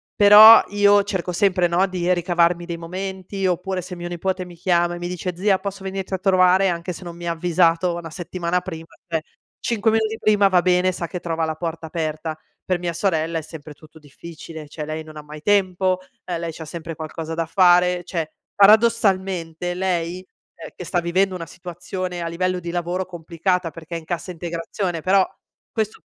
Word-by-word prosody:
Però 210 Hz, +2 st, +10 dB
io 205 Hz, 0 st, +4 dB
cerco 190 Hz, -3 st, -3 dB
sempre, 185 Hz, -1 st, +2 dB
no, 175 Hz, +3 st, +2 dB
di 180 Hz, -1 st, -1 dB
ricavarmi 175 Hz, -1 st, +2 dB
dei 170 Hz, -1 st, -5 dB
momenti 190 Hz, +3 st, -5 dB
oppure 185 Hz, +1 st, -1 dB
se 180 Hz, +1 st, -8 dB
mio 175 Hz, 0 st, -6 dB
nipote 185 Hz, +2 st, -2 dB
mi 175 Hz, -1 st, -12 dB
chiama 175 Hz, 0 st, +1 dB
e -, -, -7 dB
mi 175 Hz, 0 st, -4 dB
dice: 180 Hz, 0 st, -4 dB
"Zia 190 Hz, +1 st, +2 dB
posso 195 Hz, 0 st, -6 dB
venirti 190 Hz, 0 st, -5 dB
a -, -, -2 dB
trovare?", 185 Hz, 0 st, +4 dB
anche 175 Hz, +1 st, -3 dB
se 180 Hz, -, -10 dB
non 170 Hz, -1 st, -8 dB
mi 170 Hz, 0 st, -7 dB
ha -, -, +1 dB
avvisato 170 Hz, +1 st, +2 dB
1 170 Hz, -1 st, -6 dB
settimana 175 Hz, +1 st, -2 dB
prima, 165 Hz, -3 st, -8 dB, 0.2 s
cioè 165 Hz, -2 st, -1 dB, 0.4 s
5 225 Hz, -1 st, +1 dB
minuti 220 Hz, 0 st, 0 dB
prima 205 Hz, -2 st, +4 dB
va 185 Hz, -2 st, +3 dB
bene, 180 Hz, 0 st, +3 dB
sa 175 Hz, -1 st, -4 dB
che 180 Hz, -, -5 dB
trova 165 Hz, -1 st, -2 dB
la 160 Hz, 0 st, -3 dB
porta 165 Hz, 0 st, -5 dB
aperta. 155 Hz, -1 st, -3 dB, 0.3 s
Per 185 Hz, -1 st, +1 dB
mia 175 Hz, -1 st, -3 dB
sorella 165 Hz, -2 st, 0 dB
è -, -, -6 dB
sempre 155 Hz, -1 st, -10 dB
tutto 155 Hz, +2 st, -17 dB
difficile, 155 Hz, +1 st, -11 dB
cioè, 150 Hz, +1 st, -6 dB
lei 155 Hz, +1 st, -5 dB
non 155 Hz, 0 st, -12 dB
ha -, -, -6 dB
mai 150 Hz, 0 st, -10 dB
tempo, 185 Hz, -2 st, +2 dB, 0.2 s
e 175 Hz, -2 st, -4 dB
lei 165 Hz, -1 st, -4 dB
c'ha 160 Hz, 0 st, -9 dB
sempre 165 Hz, +1 st, -7 dB
qualcosa 160 Hz, +1 st, -6 dB
da 165 Hz, 0 st, -1 dB
fare, 180 Hz, 0 st, +4 dB
cioè, 165 Hz, -3 st, -4 dB, 0.2 s
paradossalmente 195 Hz, -6 st, +3 dB
lei, 180 Hz, -1 st, -2 dB, 0.3 s
ehm, 165 Hz, -, -10 dB
che 180 Hz, -, -8 dB
sta 175 Hz, -, 0 dB
vivendo 185 Hz, +3 st, +1 dB
una 170 Hz, -2 st, -5 dB
situazione 180 Hz, +1 st, -6 dB
a -, -, -3 dB
livello 180 Hz, +2 st, -1 dB
di 170 Hz, -1 st, -6 dB
lavoro 175 Hz, +2 st, -2 dB
complicata 175 Hz, +1 st, -2 dB
perché 165 Hz, +1 st, -9 dB
è -, -, -2 dB
in 160 Hz, -, -16 dB
cassa 175 Hz, +2 st, -4 dB
integrazione, 170 Hz, +1 st, -4 dB
però 190 Hz, +2 st, +3 dB, 0.4 s
questo 220 Hz, -2 st, -3 dB
175 Hz, 195 wpm, -22 LUFS, 165-190 Hz, 0.4 s, Però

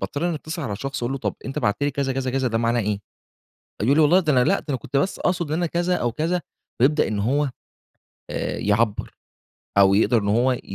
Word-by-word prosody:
باضطر 145 Hz, +4 st, -2 dB
إني 170 Hz, -, -1 dB
اتِّصل 155 Hz, +2 st, -5 dB
على 115 Hz, -, -3 dB
الشخص 135 Hz, +5 st, -4 dB
أقول 120 Hz, +3 st, -1 dB
له: 135 Hz, -, -3 dB
"طَب -, -, -2 dB
أنت 135 Hz, -, -4 dB
بعتت 105 Hz, +7 st, 0 dB
لي 145 Hz, -, +2 dB
كذا، 135 Hz, -1 st, -1 dB
كذا، 130 Hz, 0 st, -2 dB
كذا، 130 Hz, 0 st, 0 dB
ده 115 Hz, -1 st, 0 dB
معناه 115 Hz, +1 st, +1 dB
إيه؟" 105 Hz, -1 st, -1 dB, 0.8 s
يقول 130 Hz, +6 st, +3 dB
لي: 160 Hz, -, +5 dB
"والله 160 Hz, +5 st, +5 dB
ده 160 Hz, -5 st, +1 dB
أنا 125 Hz, -1 st, +4 dB
لأ 195 Hz, -, +1 dB
أنا 135 Hz, -, 0 dB
كنت 135 Hz, -, -3 dB
بس 185 Hz, +8 st, 0 dB
أقصُد 175 Hz, -2 st, 0 dB
إن 155 Hz, -, 0 dB
أنا 175 Hz, -, +1 dB
كذا 175 Hz, +2 st, 0 dB
أو 120 Hz, -7 st, -1 dB
كذا." 170 Hz, +8 st, -1 dB, 0.4 s
ويبدأ 150 Hz, +4 st, +4 dB
إن 105 Hz, -2 st, -2 dB
هو 140 Hz, +7 st, +1 dB, 0.8 s
آآ، -, -, -3 dB
يعبّر 105 Hz, +1 st, 0 dB, 0.6 s
أو 95 Hz, 0 st, +6 dB
يقدَر 115 Hz, +3 st, +3 dB
إن 100 Hz, -, -2 dB
هو 120 Hz, +5 st, +3 dB
ي 125 Hz, -, -3 dB
135 Hz, 235 wpm, -23 LUFS, 115-155 Hz, 0.8 s, أو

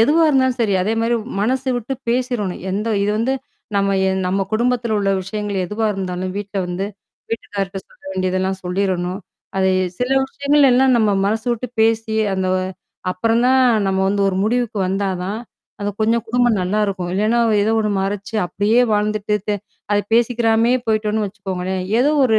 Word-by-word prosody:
எதுவா 310 Hz, +8 st, +5 dB
இருந்தாலும் 260 Hz, -3 st, +2 dB
சரி 210 Hz, -4 st, +2 dB
அதே 215 Hz, +4 st, 0 dB
மாரி 230 Hz, +1 st, +1 dB, 0.3 s
மனசு 260 Hz, +4 st, 0 dB
விட்டு 245 Hz, +3 st, -3 dB
பேசிரணும். 240 Hz, -6 st, -1 dB
எந்த 210 Hz, +4 st, -2 dB, 0.2 s
இது 205 Hz, -, +1 dB
வந்து 245 Hz, +4 st, +1 dB, 0.4 s
நம்ம 195 Hz, 0 st, +2 dB
எ -, -, +2 dB, 0.2 s
நம்ம 195 Hz, +2 st, 0 dB
குடும்பத்தில 235 Hz, 0 st, +1 dB
உள்ள 195 Hz, -1 st, +1 dB
விஷயங்கள் 205 Hz, +1 st, -4 dB
எதுவா 215 Hz, +4 st, -1 dB
இருந்தாலும் 185 Hz, -1 st, -3 dB
வீட்ல 200 Hz, -1 st, -4 dB
வந்து, 180 Hz, +2 st, -3 dB, 0.5 s
வீட்டுக்கார்ட்ட 195 Hz, -3 st, -3 dB
சொல்ல -, -, -25 dB
வேண்டியதெல்லாம் 185 Hz, 0 st, -1 dB
சொல்லிறணும். 180 Hz, 0 st, -1 dB, 0.4 s
அது 190 Hz, 0 st, +3 dB, 0.3 s
சில 250 Hz, +1 st, -1 dB, 0.2 s
விஷயங்கள்ல 280 Hz, 0 st, +3 dB
எல்லாம் 260 Hz, +1 st, +4 dB
நம்ம 215 Hz, -2 st, +3 dB, 0.2 s
மனசு 220 Hz, +3 st, -1 dB
விட்டு 235 Hz, +1 st, -4 dB
பேசி 225 Hz, 0 st, +2 dB, 0.2 s
அந்த 190 Hz, 0 st, -1 dB
வ 185 Hz, -, +2 dB, 0.5 s
அப்புறம் 225 Hz, +6 st, +1 dB
தான் 260 Hz, +1 st, +4 dB, 0.3 s
நம்ம 190 Hz, 0 st, +1 dB
வந்து 200 Hz, 0 st, +1 dB
ஒரு 185 Hz, -, -1 dB
முடிவுக்கு 235 Hz, -1 st, 0 dB
வந்தா 195 Hz, +1 st, 0 dB, 0.2 s
தான் 205 Hz, +3 st, -3 dB, 0.4 s
அது 205 Hz, 0 st, -1 dB
கொஞ்சம் 225 Hz, +1 st, +2 dB
குடும்பம் 240 Hz, -2 st, +2 dB
நல்லாயிருக்கும். 190 Hz, -1 st, -1 dB
இல்லன்னா 220 Hz, +4 st, +2 dB, 0.2 s
ஏதோ 220 Hz, -, +2 dB
ஒண்ணு 210 Hz, -1 st, 0 dB
மறைச்சு, 200 Hz, +3 st, -4 dB
அப்படியே 215 Hz, +6 st, +2 dB
வாழ்ந்துட்டு 210 Hz, 0 st, 0 dB
தெ 210 Hz, -, +2 dB, 0.4 s
அத 205 Hz, -, +4 dB, 0.2 s
பேசிக்கிறாமயே 235 Hz, 0 st, +3 dB
போய்ட்டோன்னு 215 Hz, -1 st, +1 dB
வச்சுக்கோங்களேன். 190 Hz, -2 st, -4 dB, 0.2 s
ஏதோ 280 Hz, +4 st, +4 dB
ஒரு 220 Hz, -3 st, +4 dB
210 Hz, 160 wpm, -20 LUFS, 195-235 Hz, 0.5 s, எதுவா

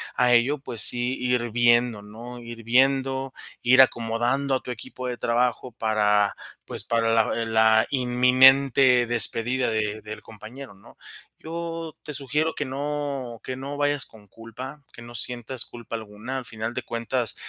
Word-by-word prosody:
a 125 Hz, -1 st, +3 dB
ello, 125 Hz, +5 st, +3 dB
pues 120 Hz, -5 st, -1 dB
sí, 125 Hz, +2 st, +3 dB
ir 125 Hz, -2 st, 0 dB
viendo, 120 Hz, -1 st, +3 dB
¿no?, 115 Hz, +4 st, -10 dB
ir 115 Hz, -1 st, -10 dB
viendo, 135 Hz, +2 st, +2 dB, 0.3 s
ir 130 Hz, +2 st, +6 dB
acomodando 125 Hz, +3 st, +1 dB
a 130 Hz, -, -2 dB
tu 125 Hz, -, -5 dB
equipo 125 Hz, +2 st, -7 dB
de 125 Hz, -1 st, -4 dB
trabajo 120 Hz, +2 st, 0 dB
para, 105 Hz, -2 st, +1 dB, 0.3 s
pues, -, -, -6 dB
para 115 Hz, -1 st, +1 dB
la 110 Hz, -1 st, +2 dB
la 110 Hz, 0 st, +4 dB
inminente 130 Hz, 0 st, +5 dB
despedida 120 Hz, +2 st, 0 dB
de 110 Hz, -1 st, -2 dB
del 105 Hz, +1 st, -8 dB
compañero, 110 Hz, +4 st, -11 dB
¿no?, 100 Hz, 0 st, -19 dB, 0.4 s
yo 165 Hz, 0 st, -6 dB
te 150 Hz, -, -7 dB
sugiero 150 Hz, +4 st, -1 dB
que 145 Hz, -, -3 dB
no 140 Hz, -3 st, -4 dB
que 130 Hz, -, -5 dB
no 140 Hz, +2 st, -6 dB
vayas 145 Hz, -1 st, 0 dB
con 105 Hz, -2 st, -17 dB
culpa, 125 Hz, +7 st, -10 dB
que -, -, -12 dB
no 120 Hz, 0 st, -11 dB
sientas 120 Hz, +1 st, -1 dB
culpa 120 Hz, -1 st, -8 dB
alguna. 110 Hz, +4 st, -7 dB
Al 130 Hz, -, -6 dB
final 110 Hz, +1 st, -5 dB
de -, -, -4 dB
cuentas, 115 Hz, -1 st, -2 dB
125 Hz, 160 wpm, -24 LUFS, 115-135 Hz, 0.4 s, ir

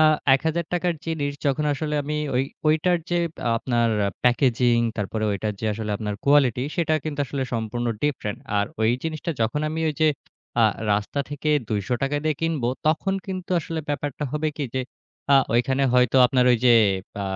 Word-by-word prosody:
আ -, -, +6 dB, 0.3 s
৳১,০০০ 170 Hz, +4 st, -1 dB
র -, -, -12 dB
জিনিস 145 Hz, -3 st, -1 dB
যখন 140 Hz, +2 st, +1 dB
আসলে 150 Hz, +2 st, -3 dB
আমি 150 Hz, +2 st, -3 dB, 0.2 s
ঐ -, -, +2 dB, 0.3 s
ঐটার 160 Hz, +4 st, +3 dB
যে, 175 Hz, -, +2 dB, 0.4 s
আপনার 120 Hz, 0 st, +1 dB, 0.4 s
প্যাকেজিং 120 Hz, -1 st, +3 dB, 0.2 s
তারপরে 110 Hz, +1 st, -2 dB
ঐটার 105 Hz, +2 st, -2 dB
যে, -, -, -5 dB
আসলে 105 Hz, 0 st, -4 dB
আপনার 105 Hz, -1 st, -3 dB
কোয়ালিটি 135 Hz, -4 st, +4 dB
সেটা 165 Hz, -2 st, +1 dB
কিন্তু 150 Hz, -2 st, -3 dB
আসলে 135 Hz, +1 st, -3 dB
সম্পূর্ণ 115 Hz, +1 st, -2 dB, 0.2 s
ডিফারেন্ট। 135 Hz, -8 st, -2 dB, 0.2 s
আর 100 Hz, -, +1 dB
ওই 110 Hz, +1 st, +3 dB
জিনিসটা 160 Hz, +1 st, -3 dB
যখন 115 Hz, +6 st, 0 dB
আমি 160 Hz, +1 st, -3 dB
ওই -, -, -7 dB
যে। -, -, +6 dB, 0.6 s
আ -, -, +6 dB, 0.3 s
রাস্তা 105 Hz, +7 st, -1 dB
থেকে 145 Hz, +1 st, -3 dB, 0.2 s
৳২০০ 120 Hz, +7 st, -1 dB
দিয়ে 155 Hz, -1 st, +1 dB
কিনব, 165 Hz, -4 st, -1 dB, 0.2 s
তখন 190 Hz, +5 st, +1 dB
কিন্তু 185 Hz, -2 st, -6 dB
আসলে 165 Hz, 0 st, -4 dB
ব্যাপারটা 145 Hz, 0 st, -3 dB
হবে 155 Hz, +1 st, 0 dB
কি 150 Hz, -, -3 dB
যে, -, -, 0 dB, 0.6 s
আ -, -, +8 dB, 0.2 s
ওইখানে 130 Hz, +3 st, +2 dB
হয়তো 125 Hz, 0 st, +4 dB
আপনার 125 Hz, 0 st, +2 dB
ওই -, -, +4 dB
যে, -, -, +7 dB, 0.5 s
আ -, -, -2 dB
140 Hz, 175 wpm, -24 LUFS, 120-155 Hz, 0.6 s, আ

